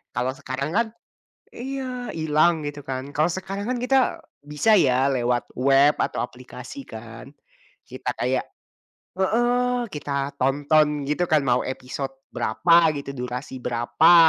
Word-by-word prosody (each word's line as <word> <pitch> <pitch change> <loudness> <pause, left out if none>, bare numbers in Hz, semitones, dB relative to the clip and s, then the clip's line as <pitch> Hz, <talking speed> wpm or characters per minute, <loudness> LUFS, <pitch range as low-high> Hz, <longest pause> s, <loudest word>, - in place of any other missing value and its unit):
Kalau 125 +1 0
sekarang 140 +1 -4
kan 230 +2 +3 0.7
iya, 255 -1 -5
hilang 160 +1 +2
gitu 145 0 -7
kan. 130 +1 -5
Kalau 155 +2 +3
sekarang 195 +3 -4
kan 255 - 0
kita 260 +2 +3 0.4
bisa 150 +10 +3
ya 130 -3 +3
lewat 120 -2 0
web 135 +3 +4
atau - - -1
aplikasi 130 - -9
kan, 115 +4 -10 0.6
kita - - -4
kayak - - 0 0.7
heeh, 245 +4 +1
kita 140 -4 -3
tonton 145 +2 +2
gitu 175 +4 +1
kan 155 -1 +4
mau 125 0 +3
episode 130 +1 -5 0.2
berapa 165 +8 +4
gitu, 140 -1 -6
durasi 125 +2 -5
berapa, 120 +7 +4
145 Hz, 130 wpm, -24 LUFS, 130-190 Hz, 0.7 s, web